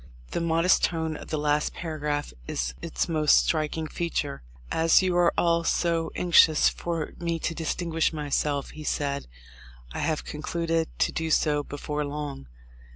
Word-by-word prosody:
The - - -1
modest 165 +2 +3
tone 160 -2 0
of - - -9
the 155 - -1
last 150 0 0
paragraph 150 - -3
is - - -2
its - - -2
most 155 -3 +4
striking 155 0 -1
feature. 155 - -3 0.3
"As 165 +3 +4
you 185 -1 +1
are 175 -1 +4
all 170 -1 +3
so 165 -1 +1
anxious 165 -3 +5
for 165 -3 -4
me 170 -1 -1
to 165 - -2
distinguish 165 0 -1
myself," 145 -2 -1
he 155 - -9
said, 140 -1 -2 0.7
"I - - -4
have 160 -2 -1
concluded 165 +1 -1
to - - +2
do 160 0 -2
so 150 -2 +2
before 150 +1 -4
long." 145 - -5
160 Hz, 155 wpm, -26 LUFS, 150-165 Hz, 0.7 s, anxious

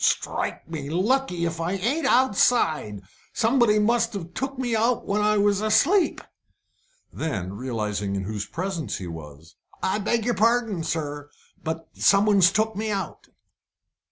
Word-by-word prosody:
"Strike - - -1
me 155 -4 -6
lucky, 185 - 0
if 165 0 -3
I 170 +3 -1
ain't 240 - 0
outside! 190 - +2 0.3
Somebody 235 -2 +3
must 230 +2 +2
have 175 -4 -6
took 270 +3 -4
me 245 -3 -1
out 230 +2 +1
when 205 +1 0
I 210 0 +3
was 205 0 +2
asleep." 275 - +3 0.9
Then, 95 - -3
realising 105 -4 -3
in 95 - -2
whose 105 +1 -4
presence 180 -2 -4
he 95 - -7
was 80 -1 -10 0.3
"I 190 +3 +1
beg 220 +2 0
your 245 - +1
pardon, 225 -3 +1
sir, 145 -2 -4 0.3
but 160 +1 -4
someone's 200 -2 +4
took 220 +2 0
me 215 +2 -2
out." 195 -5 -4
195 Hz, 145 wpm, -24 LUFS, 150-225 Hz, 0.9 s, someone's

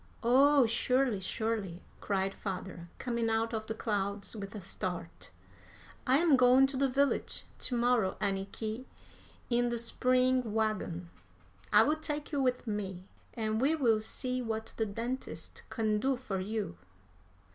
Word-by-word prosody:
"Oh, 270 +3 +6
surely, 245 0 +1
surely!" 195 -3 -3 0.2
cried 195 -1 -1
father, 185 -3 -6
coming 235 -2 -1
out 225 +1 0
of 220 -1 -3
the 220 - -3
clouds 200 -1 -1
with 200 0 -7
a - - -4
start. 180 -2 -5 0.8
"I 260 +2 +5
am 315 -3 +5
going 255 +1 +6
to - - -3
the 275 0 +2
village 280 +2 +1 0.2
to 245 - 0
morrow, 235 -5 +2
Anniky, 210 +5 -3 0.7
in 240 0 +3
the 235 - -1
spring 255 0 +2
wagon. 185 -6 -1 0.6
I - - +7
will 305 +2 +2
take 300 -1 -3
you 285 -2 0
with 250 -1 +1
me, 195 -4 -4 0.3
and 220 0 -1
we 295 +5 +3
will 235 -8 +3
see 255 +3 -2
what 220 -1 -4
the 220 - 0
dentist 235 +6 -5
can 215 -2 0
do 265 +4 +1
for 210 -7 -4
you." 205 - -3
225 Hz, 145 wpm, -32 LUFS, 200-255 Hz, 0.8 s, I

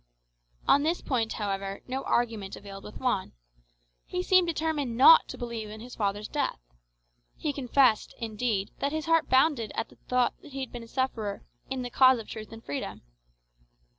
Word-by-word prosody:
On 280 - +6
this 325 +4 +1
point, 230 -5 -1
however, 195 -1 -3
no 260 +1 -2
argument 225 -5 0
availed 195 -1 -10
with 210 - -9
Juan. 245 -7 -1 0.7
He 180 - -2
seemed 370 - +4
determined 305 -7 -1
not 480 - +8
to - - -7
believe 235 -3 -5
in 215 +1 -8
his 245 +3 -10
father's 205 0 -1
death. 290 - -1 0.8
He 290 - -2
confessed, 255 -4 +2
indeed, 220 -3 -2
that 280 - 0
his 315 0 -2
heart 330 0 +3
bounded 260 -5 +3
at - - -2
the - - -19
thought 250 -1 +2
that 290 - -14
he 270 - -4
had 260 - -5
been 240 - -7
a 230 - -11
sufferer 225 -5 -2 0.3
"in 260 -1 -2
the 245 - -5
cause 260 0 +6
of 225 - -8
truth 215 -1 -8
and 225 0 -11
freedom." 140 - -5
240 Hz, 180 wpm, -28 LUFS, 215-275 Hz, 0.8 s, not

